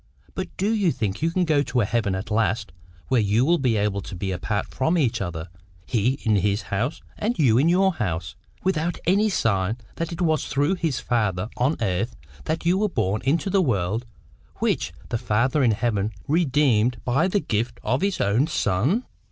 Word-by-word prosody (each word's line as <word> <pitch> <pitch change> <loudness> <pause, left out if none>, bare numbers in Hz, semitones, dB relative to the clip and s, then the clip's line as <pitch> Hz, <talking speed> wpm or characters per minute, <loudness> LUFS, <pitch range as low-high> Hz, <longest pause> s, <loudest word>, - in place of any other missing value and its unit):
But 185 - -3
do 205 +4 +1
you 200 -6 +2
think 105 -3 -3
you 165 - +2
can 180 +2 +1
go 155 -3 +3
to 125 -2 -1
a - - +2
heaven 105 -3 0
at 100 +4 -5
last 110 -2 0 0.4
where 125 - +3
you 105 +4 +2
will 170 +3 +3
be 125 -5 +1
able 100 -1 0
to 95 - -8
keep 95 +2 -3
apart 100 +3 -2
from 160 +7 0
each 130 -11 +1
other, 85 -3 -4 0.4
he 120 +3 +1
in 110 -3 +3
his 100 +2 +1
house 120 +9 -1 0.2
and 230 +4 -1
you 125 -6 +4
in 155 +5 +4
your 190 +2 +3
house, 85 - -3 0.3
without 175 -2 0
any 200 +5 +3
sign 105 - +1 0.2
that 165 0 -3
it 170 - -6
was 160 -4 +1
through 145 +6 +1
this 165 -8 -1
father 105 -5 0
on 130 +6 +1
earth 105 +4 -1 0.3
that 160 +2 -2
you 180 +3 +3
were 210 0 +1
born 105 - -1
into 165 +8 +1
the 195 0 +4
world 110 - 0 0.5
which - - 0 0.2
the 120 - -1
Father 125 +8 +1
in 120 - +4
heaven 110 -2 0 0.2
redeemed 135 -7 +2
by 135 +8 +2
the 200 +2 +1
gift 120 - -2
of 130 - 0
His 200 -1 0
own 110 +9 +2
Son?" 145 - +1
125 Hz, 195 wpm, -24 LUFS, 105-165 Hz, 0.5 s, you